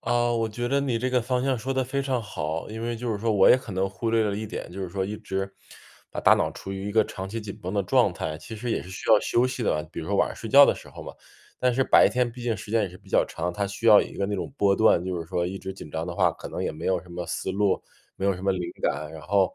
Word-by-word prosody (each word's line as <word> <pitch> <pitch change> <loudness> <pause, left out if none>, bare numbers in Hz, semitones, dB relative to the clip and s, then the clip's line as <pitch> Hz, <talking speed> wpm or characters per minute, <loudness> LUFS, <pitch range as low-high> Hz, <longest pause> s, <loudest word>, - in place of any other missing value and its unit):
啊， 120 0 +1
我 115 -1 0
觉 120 +3 -3
得 140 +2 +2
你 130 -5 0
这 125 - -1
个 125 -1 +2
方 125 +1 0
向 135 -1 +1
说 130 +4 -3
得 130 -1 0
非 140 +2 -2
常 130 -3 0
好。 80 -7 -4
因 110 +1 -6
为 120 0 -2
就 115 0 -2
是 105 - -3
说 115 +2 0
我 100 -2 +6
也 - - +8
可 130 -3 -9
能 95 +1 0
忽 110 +4 -3
略 115 -1 +3
了 100 -1 -1
一 110 - -4
点， 105 - -6
就 95 - -6
是 95 - -4
说 95 +2 -2
一 105 +2 -4
直 95 0 -4 0.6
把 - - -4
大 - - +7
脑 - - 0
处 95 - -8
于 95 +1 -4
一 - - -4
个 110 0 +4
长 95 -1 -6
期 115 +3 -4
紧 105 -2 -7
绷 90 - -4
的 100 -1 +1
状 90 - +3
态， 75 - -4
其 110 - -9
实 120 +3 -4
也 - - -1
是 90 - -11
需 95 - -7
要 110 - +8
休 120 +2 +2
息 130 -1 -4
的。 75 -7 +1
比 - - -5
如 - - -7
说 - - +1
晚 - - +3
上 - - -7
睡 - - -7
觉 - - +9
的 - - +3
时 - - -12
候 - - -10
嘛， - - -7 0.5
但 125 0 +3
是 130 +2 +2
白 - - +6
天 125 -1 0
毕 125 0 -9
竟 120 -2 0
时 105 - -9
间 115 -1 +3
也 100 - -1
是 90 +1 -13
比 - - -21
较 - - +3
长， 90 +2 -3
它 100 +2 -1
需 100 +4 -4
要 105 -2 +9
一 - - -8
个 100 - -1
那 105 - -2
种 100 - -4
波 100 -4 +3
段， 110 -5 +4
就 90 -1 -2
是 85 - -7
说 90 -1 0
一 95 +2 -5
直 95 0 -6
紧 95 -5 -11
张 80 +2 -3
的 90 - -5
话， - - +3
可 - - -9
能 - - -4
也 - - -1
没 75 - -6
有 95 -2 +1
什 90 - -18
么 85 0 -5
思 95 +2 -3
路， 100 0 +1 0.4
没 95 - -1
有 100 - +3
什 90 - -9
么 100 - +2
灵 95 - -3 0.2
感， 75 +1 -1
然 80 - -9
后 95 +3 +2
105 Hz, 355 characters per minute, -26 LUFS, 95-120 Hz, 0.6 s, 觉